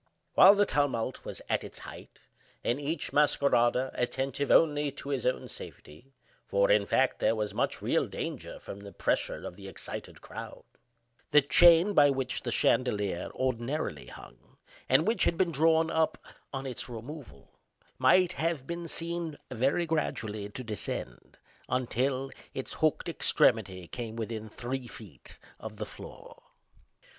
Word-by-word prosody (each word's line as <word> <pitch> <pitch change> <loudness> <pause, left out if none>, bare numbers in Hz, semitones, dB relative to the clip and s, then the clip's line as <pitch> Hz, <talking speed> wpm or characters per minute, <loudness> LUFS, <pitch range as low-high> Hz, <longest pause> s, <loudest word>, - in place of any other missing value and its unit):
While 200 +2 +8
the 205 0 +4
tumult 135 - -1
was - - -7
at - - 0
its - - -9
height, - - -11 0.5
and 125 +5 0
each 150 +2 -3
masquerader 130 -3 +3
attentive 135 +2 -2
only 150 -2 +4
to 140 - -8
his 135 -3 -1
own 125 - -1
safety 80 - -11 0.4
(for, 100 0 +3
in 100 -1 +3
fact, 130 -1 +2
there 110 +1 +2
was 105 -2 -2
much - - -1
real - - +1
danger - - -5
from 100 - -9
the 100 0 -11
pressure - - -1
of - - -7
the 95 +1 -10
excited 95 - -7
crowd), - - -9 0.7
the 150 - +6
chain 170 +6 +6
by 145 -5 +6
which 135 -2 -2
the 120 - -4
chandelier 105 -8 +1
ordinarily 130 +4 -2
hung, - - -14 0.3
and - - +5
which 225 - +2
had 170 - +1
been 180 -2 +2
drawn 160 +2 +3
up 160 -1 +1 0.3
on 135 -1 -4
its 130 -1 -5
removal, 120 - -9 0.5
might 175 +8 +5
have 165 -5 -1
been 170 +1 -5
seen 165 -1 -3
very 135 +8 +1
gradually 110 -10 -2
to 130 +5 -7
descend, 105 - -5 0.3
until 130 +1 -1 0.2
its - - -4
hooked - - +1
extremity 95 -2 +2
came 115 +1 -6
within 110 -1 -5
three 125 +3 -5
feet 95 - -11 0.2
of 110 0 -8
the 105 - -4
floor. - - -12
130 Hz, 150 wpm, -29 LUFS, 110-150 Hz, 0.7 s, While